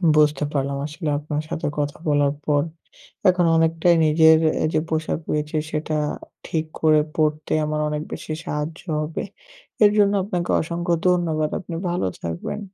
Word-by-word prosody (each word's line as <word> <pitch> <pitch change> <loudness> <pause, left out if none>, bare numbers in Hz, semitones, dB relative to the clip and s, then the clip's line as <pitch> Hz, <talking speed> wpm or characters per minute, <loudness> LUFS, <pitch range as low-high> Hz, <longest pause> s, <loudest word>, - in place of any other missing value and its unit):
বুঝতে 150 -1 +3
পারলাম। 140 -1 -1
আসলে 155 +1 -4
আপনার 150 0 -3
সাথে - - -2
কথা 145 -1 -2
বলার 145 -1 +3
পর, 145 -1 +2 0.7
এখন 180 -1 +3
অনেকটাই 165 +1 +3
নিজের 160 +1 +6 0.3
এ - - +3
যে 155 - +3
পোশাক 160 -1 -1
রয়েছে, 150 +1 -1
সেটা 155 0 -2 0.5
ঠিক 160 -1 -1 0.2
করে 155 -1 +5 0.2
পড়তে 155 -1 0
আমার 150 0 -2
অনেক 150 0 -2
বেশি 155 - -5
সাহায্য 150 +3 -4 0.2
হবে। 155 +1 -3 0.6
এর 205 - +7
জন্য 205 -1 +4
আপনাকে 180 -3 -3
অসংখ্য 170 +2 -2
ধন্যবাদ। 165 -4 +1
আপনি 175 -3 -7
ভালো 175 - 0
থাকবেন। 85 - -4
155 Hz, 150 wpm, -22 LUFS, 150-170 Hz, 0.7 s, এর